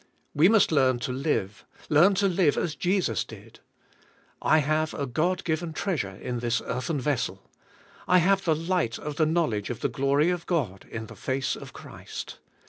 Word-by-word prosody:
We 160 +6 +5
must 220 -5 +4
learn 130 -4 +3
to 125 - -2
live, 125 -7 -2 0.2
learn 175 +7 +5
to 200 +1 +2
live 175 -5 +2
as 165 - -1
Jesus 175 - 0
did. - - -13 0.8
I 155 - +4
have 155 +1 0
a 140 - -2
God 175 +9 0
given 160 0 -2
treasure 150 - -2
in 120 +4 -4
this 120 0 0
earthen 135 +5 -2
vessel. 125 -9 -2 0.6
I 180 - +5
have 195 +2 +3
the 160 -2 +2
light 165 -7 -1
of 150 -1 -6
the 155 - +3
knowledge 155 -11 0
of 120 - -5
the - - 0
glory 140 +4 +2
of 175 -1 -4
God 120 - -2
in 115 -1 -5
the - - -12
face 135 0 -2
of - - -10
Christ. - - -9
150 Hz, 180 wpm, -26 LUFS, 125-175 Hz, 0.8 s, We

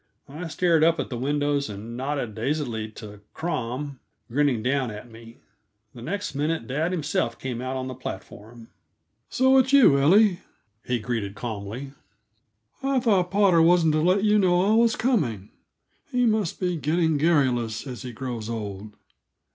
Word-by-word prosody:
I 155 +5 -7
stared 165 -1 +2
up 165 0 +3
at - - -3
the - - -3
windows, 145 +2 0
and 105 +3 -7
nodded 130 -3 -3
dazedly 115 -2 -2
to 105 -2 -11
Crom, 135 -3 -4 0.3
grinning 135 -4 +1
down 130 0 0
at 110 +3 -9
me. 115 +1 -13 0.6
The 120 - -11
next 200 +7 -4
minute, 150 -1 -1
dad 150 +8 -1
himself 150 -8 -1
came 125 -2 -5
out 130 +1 -3
on 130 0 -4
the 130 - -5
platform. 115 -1 -9 0.6
"So 260 +1 +4
it's 260 +1 +2
you, 240 - +6
Ellie?" 185 +6 +4 0.4
he 125 - -1
greeted 110 -3 -3
calmly. 115 +4 -6 0.9
"I 270 -1 +1
thought 200 -7 +2
Potter 195 -3 +4
wasn't 165 -1 +4
to 155 - +2
let 185 +4 +2
you 210 0 +4
know 180 -2 +3
I 205 +2 +3
was 230 0 +4
coming; 135 - 0 0.6
he 250 -1 +2
must 215 -6 0
be 180 -2 -1
getting 160 +2 +1
garrulous 130 -8 +1
as 125 -3 -7
he 125 - -6
grows 120 -2 -5
old. 105 -2 -6
140 Hz, 160 wpm, -25 LUFS, 115-175 Hz, 0.9 s, you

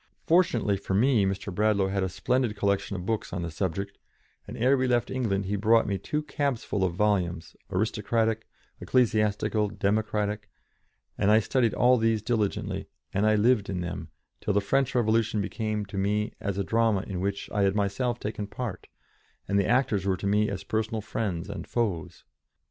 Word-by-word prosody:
Fortunately 125 - +3
for 95 0 -3
me, 115 -1 +4
Mr. 95 0 -3
Bradlaugh 100 -1 +2
had 100 0 -1
a 95 - 0
splendid 125 +4 0
collection 100 -1 0
of 90 -1 -5
books 110 +1 -2
on 85 - -3
the 85 - -4
subject, 95 +4 -3 0.5
and - - -7
ere 130 +4 +4
we 130 -1 +1
left 120 -1 +1
England 105 -7 -1
he 100 +2 -1
brought 110 +3 +4
me 100 -2 -1
two 150 - -2
cabs 140 -4 -1
full 100 - -1
of 90 -2 0
volumes, 90 -5 0
aristocratic, 110 +3 0 0.3
ecclesiastical, 105 -3 +1
democratic, 105 0 -1 0.7
and 100 - +3
I 110 +1 +6
studied 120 +1 +1
all 125 +2 +5
these 110 -2 +1
diligently, 110 -3 -1 0.3
and 100 +3 +2 0.2
lived 115 -5 +3
in 90 -2 -2
them, 85 0 -5 0.3
till 105 - -1
the - - +5
French 135 +6 0
Revolution 110 -2 +2
became 105 +1 -2
to 100 0 -5
me 105 +2 0
as 100 -1 -3
a 100 - 0
drama 110 0 +2
in 95 -2 -4
which 100 +1 -2
I 105 - 0
had 100 0 +2
myself 110 +4 0
taken 105 -1 -4
part, 105 -3 -6 0.6
and 100 +1 +2
the 100 - +1
actors 120 -6 +2
were 95 -1 +1
to - - -6
me 105 +2 +2
as 100 - -4
personal 110 0 -2
friends 100 -5 -3
and 100 -4 -6
foes. 100 -10 -2
105 Hz, 180 wpm, -27 LUFS, 100-115 Hz, 0.7 s, I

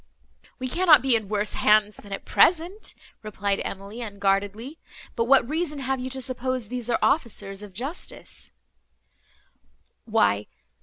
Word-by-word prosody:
"We 255 - -4
cannot 330 +2 +5
be 265 -3 +3
in 215 -3 -2
worse 210 0 -1
hands 210 0 +3
than 205 - -13
at 195 - -5
present," 355 +5 +2 0.3
replied 200 -2 -2
Emily, 200 +4 -7
unguardedly; 205 +6 -2 0.4
"but 230 - +1
what 255 -1 +5
reason 310 0 -2
have 265 -1 -2
you 255 +1 -4
to 265 0 -5
suppose 255 -3 -3
these 245 -1 -4
are 235 - +2
officers 205 -8 0
of 205 -1 -9
justice?" 265 - -6
235 Hz, 135 wpm, -25 LUFS, 205-270 Hz, 0.4 s, cannot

